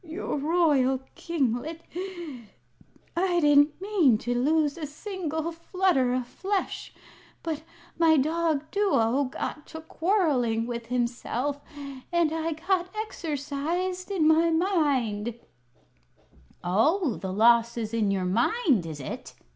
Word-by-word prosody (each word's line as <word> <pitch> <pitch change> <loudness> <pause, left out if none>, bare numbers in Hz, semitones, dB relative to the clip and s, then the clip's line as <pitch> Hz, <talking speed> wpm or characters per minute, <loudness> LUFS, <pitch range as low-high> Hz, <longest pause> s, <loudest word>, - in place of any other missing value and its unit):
"Your 330 +2 -4
royal 285 -5 +2
kinglet, 310 0 -2 1.3
I 350 0 +2
didn't 295 0 +4
mean 370 - +3
to 240 +3 -2
lose 290 +4 +2
a 315 -3 -5
single 320 0 -4
flutter 335 -6 +1
o' 255 - 0
flesh. 385 +10 -3 0.5
But 315 -2 -3 0.4
my 320 -2 +5
dog 315 +1 +1
Duo 285 - +2
got 295 +3 -5
to 320 - -8
quarrelling 305 - +1
with 235 -1 -5
himself 250 +3 -2 0.5
and 340 -2 +2
I 325 0 -1
got 360 +3 0
exercised 345 0 -3
in 355 -6 +2
my 320 +1 +5
mind 280 - +1 0.7
" - - -32
"Oh, 250 - +2
the 190 -1 -4
loss 235 +3 +4
is 220 -1 -3
in 220 -3 +1
your 190 -2 0
mind, 235 - +2
is 155 -2 -6
it?" 135 - -7
300 Hz, 120 wpm, -27 LUFS, 240-335 Hz, 1.3 s, my